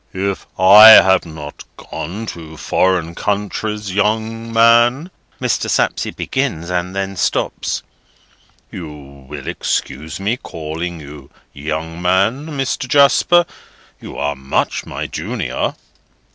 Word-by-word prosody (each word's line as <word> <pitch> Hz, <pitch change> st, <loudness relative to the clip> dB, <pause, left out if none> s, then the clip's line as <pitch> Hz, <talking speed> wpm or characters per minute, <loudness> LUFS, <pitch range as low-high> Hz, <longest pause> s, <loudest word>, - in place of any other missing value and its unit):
"If 100 Hz, +1 st, -3 dB
I 100 Hz, +4 st, +9 dB
have 95 Hz, -5 st, +7 dB
not 75 Hz, -2 st, -9 dB
gone 100 Hz, +8 st, -7 dB
to 80 Hz, -5 st, -9 dB
foreign 90 Hz, -2 st, 0 dB
countries, 105 Hz, +1 st, -3 dB
young 110 Hz, +3 st, -1 dB
man," 120 Hz, +8 st, +4 dB, 0.3 s
Mr. -, -, -1 dB
Sapsea -, -, 0 dB
begins, 100 Hz, -, -3 dB
and 90 Hz, +1 st, -2 dB
then 95 Hz, 0 st, -3 dB
stops:—"You 85 Hz, -2 st, -5 dB
will 70 Hz, -1 st, -11 dB
excuse 75 Hz, +6 st, -3 dB
me 105 Hz, +5 st, -1 dB
calling 80 Hz, -2 st, -6 dB
you 70 Hz, -2 st, -12 dB, 0.2 s
young 80 Hz, +3 st, -5 dB
man, 100 Hz, -, +1 dB
Mr. 135 Hz, -4 st, -3 dB
Jasper? 145 Hz, +6 st, +4 dB, 0.5 s
You -, -, -10 dB
are 70 Hz, 0 st, -2 dB
much 65 Hz, 0 st, -2 dB
my -, -, -5 dB
junior." -, -, -3 dB
95 Hz, 110 wpm, -17 LUFS, 80-110 Hz, 0.5 s, I